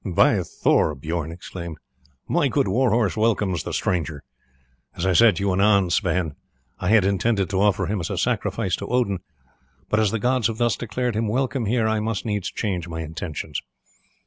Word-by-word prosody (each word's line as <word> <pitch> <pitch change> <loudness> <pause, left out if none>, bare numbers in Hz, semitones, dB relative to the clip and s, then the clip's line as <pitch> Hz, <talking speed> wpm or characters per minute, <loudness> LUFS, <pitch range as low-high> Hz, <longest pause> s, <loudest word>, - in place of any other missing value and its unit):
"By 90 -4 +3
Thor!" 75 - +1
Bijorn 80 +3 -3
exclaimed, 85 -1 -8 0.5
"my - - +2
good - - +1
war 125 +6 +2
horse 110 -2 +1
welcomes 105 -6 +1
the - - -5
stranger. 80 -5 -2 0.7
As 85 - -2
I 95 - +3
said 115 +1 +6
to 90 - -4
you 100 - +2
anon, 100 -1 +3
Sweyn, 90 -5 +1 0.5
I 90 - -1
had 105 -3 +5
intended 100 0 +1
to 95 -1 +1
offer 100 -2 +2
him 105 0 -2
as 85 - -3
a - - -3
sacrifice - - 0
to - - -6
Odin; 120 -7 0 0.7
but 110 - +2
as 110 -2 +3
the 115 - -1
gods 125 +1 +1
have 115 -1 -4
thus 120 -3 +2
declared 120 0 -2
him 110 +1 0
welcome 125 +1 -1
here 115 0 +2
I 110 0 +1
must 110 0 -2
needs 105 -4 -2
change 90 -5 -3
my 80 -1 -5
intentions. 80 0 -5
100 Hz, 190 wpm, -23 LUFS, 90-115 Hz, 0.7 s, said